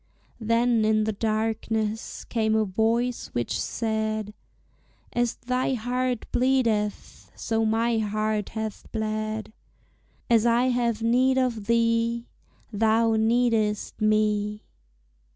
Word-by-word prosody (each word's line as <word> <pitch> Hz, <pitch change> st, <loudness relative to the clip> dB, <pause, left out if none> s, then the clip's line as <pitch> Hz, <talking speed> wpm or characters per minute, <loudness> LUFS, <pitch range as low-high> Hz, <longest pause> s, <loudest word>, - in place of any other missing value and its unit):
Then 230 Hz, 0 st, +2 dB
in 215 Hz, 0 st, +3 dB
the 220 Hz, -, 0 dB
darkness 220 Hz, 0 st, -2 dB
came 220 Hz, -2 st, 0 dB
a 220 Hz, 0 st, +2 dB
voice 230 Hz, +5 st, 0 dB
which 120 Hz, -1 st, -1 dB
said, 220 Hz, -2 st, -2 dB, 0.8 s
"As 240 Hz, -1 st, 0 dB
thy 255 Hz, +1 st, -1 dB
heart 250 Hz, +1 st, -2 dB
bleedeth, 235 Hz, -5 st, 0 dB
so 225 Hz, 0 st, -1 dB
my 225 Hz, +1 st, +1 dB
heart 215 Hz, 0 st, -1 dB
hath 220 Hz, -1 st, -5 dB
bled, 215 Hz, 0 st, -3 dB, 0.7 s
As 230 Hz, -2 st, +4 dB
I 240 Hz, +2 st, +3 dB
have 235 Hz, -3 st, 0 dB
need 255 Hz, +3 st, +3 dB
of 235 Hz, -5 st, -1 dB
thee, 230 Hz, 0 st, +1 dB, 0.5 s
Thou 225 Hz, +1 st, +3 dB
needest 220 Hz, -2 st, +1 dB
me." 210 Hz, -1 st, +1 dB
225 Hz, 105 wpm, -25 LUFS, 215-235 Hz, 0.8 s, As